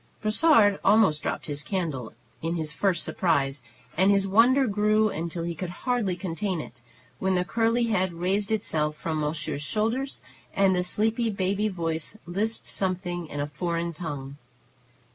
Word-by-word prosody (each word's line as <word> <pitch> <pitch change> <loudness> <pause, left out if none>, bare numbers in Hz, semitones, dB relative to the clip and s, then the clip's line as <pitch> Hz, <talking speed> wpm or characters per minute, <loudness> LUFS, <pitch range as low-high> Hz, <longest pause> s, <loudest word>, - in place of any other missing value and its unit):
Brossard 215 -2 +4
almost 195 -9 +4
dropped - - -3
his 145 -2 -3
candle 155 - -3 0.3
in 165 +1 -1
his 155 -3 -2
first 185 0 +1
surprise, 145 -6 0 0.3
and 190 +3 +4
his 200 -1 +3
wonder 245 +7 +5
grew 215 0 +2
until 170 -1 -4
he 170 0 -2
could 170 +2 -5 0.2
hardly 240 -8 +1
contain 185 +1 -3
it, 120 -5 -9 0.4
when 190 0 +1
the 180 0 +1
curly 230 +3 +1
head 190 -5 +1
raised 195 +5 -1
itself 155 -8 0
from 155 +1 -3
monsieur's 150 -1 -2
shoulder, 225 - 0 0.5
and 195 -1 +4
the 180 - +1
sleepy 220 +5 +1
baby 200 +1 0
voice 165 0 -3
lisped 210 +6 -2
something 180 -2 -2
in 145 - -6
a 145 - 0
foreign 170 +2 -2
tongue. 145 -4 -6
185 Hz, 155 wpm, -26 LUFS, 165-210 Hz, 0.5 s, wonder